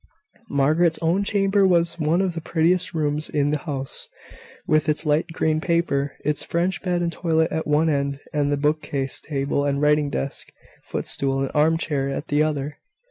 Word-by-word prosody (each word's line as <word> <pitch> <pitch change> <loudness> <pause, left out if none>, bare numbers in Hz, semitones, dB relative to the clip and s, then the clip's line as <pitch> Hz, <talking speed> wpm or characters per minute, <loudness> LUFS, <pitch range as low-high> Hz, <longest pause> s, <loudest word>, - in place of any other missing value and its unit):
Margaret's 155 +4 +2
own 175 +5 +2
chamber 195 -1 +2
was 170 -1 +2
one 160 +4 +2
of 185 -2 -1
the 165 - -5
prettiest 170 +3 +1
rooms 150 -1 -1
in 145 -1 +1
the 150 - 0
house, 135 -1 -3 0.6
with 155 0 +2
its 150 +2 0
light 150 +1 +2
green 155 -1 0
paper, 165 -5 0
its 150 0 +1
French 175 +3 -1
bed 175 -2 0
and 170 0 -1
toilet 160 -2 +1
at 160 0 -2
one 150 +2 +3
end, 140 -2 0
and 145 -1 +1
the 145 - +1
book 150 +2 +1
case, 135 -1 -3
table 140 -1 -1
and 140 -1 0
writing 150 0 +3
desk, 140 -1 -4 0.3
footstool 135 -1 -1
and 135 - -3
armchair, 150 -2 +1
at 140 +3 -5
the 145 +1 +2
other. 150 -1 -2
155 Hz, 180 wpm, -23 LUFS, 145-170 Hz, 0.6 s, one